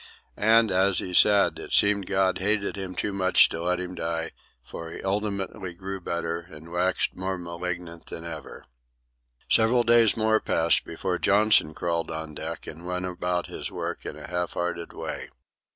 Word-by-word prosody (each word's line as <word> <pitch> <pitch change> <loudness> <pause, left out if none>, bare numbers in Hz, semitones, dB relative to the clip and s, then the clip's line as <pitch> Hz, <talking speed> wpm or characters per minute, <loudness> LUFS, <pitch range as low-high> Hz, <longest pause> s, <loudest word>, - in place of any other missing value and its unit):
And 110 0 +4
as 95 +1 +3
he 90 - -3
said, 100 +2 +5
it - - -8
seemed 100 -2 +4
God 95 -1 +1
hated 100 +1 0
him 95 -2 -6
too 105 - -2
much 95 -1 +5
to 80 - -4
let 90 +1 0
him 90 0 -5
die, 85 -1 -3 0.3
for 85 +5 -8
he - - -8
ultimately 100 -2 -3
grew 95 +1 -6
better 85 -1 -2
and 80 -1 -12
waxed 90 +1 0
more 95 +1 -3
malignant 85 -1 -6
than 80 - -8
ever. 80 -2 -8 0.8
Several 120 +2 +4
days 115 -2 +5
more 110 0 +3
passed 80 +1 +3
before - - -3
Johnson 100 -6 +4
crawled 85 -1 -2
on 80 -1 -5
deck 80 +3 -5
and 80 +2 -9
went 90 0 -2
about 90 -1 -2
his - - -5
work - - -5
in - - -6
a - - -9
half 90 0 -2
hearted 85 -1 -3
way. - - -6
90 Hz, 170 wpm, -26 LUFS, 85-100 Hz, 0.8 s, said